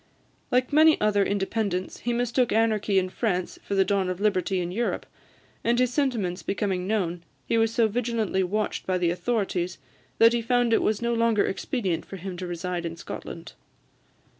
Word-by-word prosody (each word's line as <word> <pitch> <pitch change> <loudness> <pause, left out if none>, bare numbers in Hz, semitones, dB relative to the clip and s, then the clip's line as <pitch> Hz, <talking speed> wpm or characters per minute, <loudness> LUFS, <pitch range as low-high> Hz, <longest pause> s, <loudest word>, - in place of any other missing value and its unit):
Like 250 +3 +1
many 315 +1 +6
other 210 -1 +3
independents, 195 -1 -2
he 240 - -2
mistook 240 +1 +1
anarchy 215 -2 +2
in 185 -1 +3
France 185 -3 -2
for 200 - -3
the 195 -1 +4
dawn 195 -1 +1
of 185 0 -3
liberty 190 -2 +1
in 175 0 -3
Europe; 235 +6 -2 0.6
and 235 +1 +2
his 250 -1 +2
sentiments 225 -11 0
becoming 195 -2 -2
known, 180 -5 -1 0.2
he - - 0
was 225 0 +3
so 230 -1 +3
vigilantly 220 -3 -1
watched 205 +4 -2
by 185 -1 +1
the 175 -2 +1
authorities, 185 -2 -1 0.4
that 230 +1 +6
he 235 - +1
found 240 0 +2
it - - +4
was 215 +1 0
no 235 0 +1
longer 230 -2 +2
expedient 195 - -2
for - - -9
him 190 0 -6
to 180 0 -5
reside 175 0 -3
in 165 0 -5
Scotland. 165 0 -8
205 Hz, 180 wpm, -26 LUFS, 185-230 Hz, 0.6 s, many